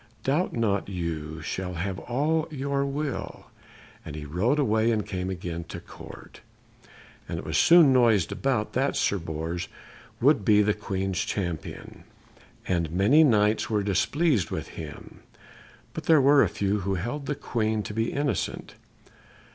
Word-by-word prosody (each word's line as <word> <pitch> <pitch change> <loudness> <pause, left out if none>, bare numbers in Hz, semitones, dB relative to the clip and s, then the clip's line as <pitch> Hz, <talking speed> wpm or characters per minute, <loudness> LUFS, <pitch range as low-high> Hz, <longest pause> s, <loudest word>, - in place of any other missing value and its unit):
Doubt 150 +7 0
not 100 -4 0
you 80 -4 -4
shall 90 +2 -4
have 95 +3 -3
all 155 +6 0
your 140 -2 -1
will." 145 0 -4 0.6
And 75 - -8
he 75 -1 -6
rode 95 - 0
away, 110 -5 +2
and 110 -3 0
came 90 -1 -4
again 85 -2 -5
to - - -8
the - - -13
Court. - - -12 0.9
It - - -4
was - - -3
soon 165 -5 +7
noised 115 -8 +3
about 125 -6 -1
that 135 +3 0
Sir 100 - +1
Bors 80 +1 -4 0.5
would 140 +3 +4
be 105 -2 +5
the 105 +1 +2
Queen's 95 -3 -2
champion, 85 -6 -5 0.6
and 85 -3 0
many 100 - +4
Knights 105 -5 +3
were 105 -2 +1
displeased 105 - +1
with - - -5
him; - - -10 0.7
but - - -6
there 160 -2 +6
were 140 +1 +6
a - - +3
few 100 +1 -1
who 100 0 -1
held 120 - -4
the 145 - -1
Queen 110 -4 -1
to 105 - -6
be 115 +2 -1
innocent. 145 0 -2
105 Hz, 155 wpm, -26 LUFS, 90-135 Hz, 0.9 s, soon